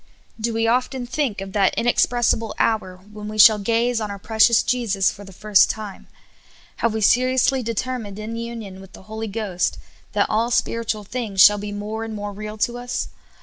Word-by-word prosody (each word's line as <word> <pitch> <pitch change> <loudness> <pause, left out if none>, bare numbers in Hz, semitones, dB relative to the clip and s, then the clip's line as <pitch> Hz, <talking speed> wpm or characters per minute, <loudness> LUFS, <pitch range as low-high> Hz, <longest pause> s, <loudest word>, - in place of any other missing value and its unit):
Do 230 +2 -1
we 225 0 0
often 250 +2 0
think 250 -5 -2
of 195 0 -7
that 195 -2 +2
inexpressible 235 -2 +1
hour 200 -5 0 0.2
when 210 0 -8
we 215 0 -6
shall 215 0 +8
gaze 230 +3 0
on 210 - -3
our 200 - -6
precious 220 +2 +3
Jesus 210 -6 +1
for 205 - -12
the 195 - -12
first 205 +1 +3
time? 215 -3 -6 0.7
Have 230 -2 0
we 220 - -2
seriously 255 +4 +3
determined 230 -2 -4
in 215 +2 -6
union 230 -5 -7
with 195 - -15
the - - -13
Holy 220 +2 -6
Ghost 200 -4 -2 0.4
that 205 -1 +2
all 225 +2 0
spir 230 -1 0
itual 215 -2 -3
things 215 -3 -5
shall 205 +2 +8
be 205 0 -5
more 210 +2 -5
and 225 -1 -6
more 205 0 -5
real 210 +1 -7
to 240 +3 -1
us? 245 0 -4
220 Hz, 190 wpm, -22 LUFS, 205-235 Hz, 0.7 s, shall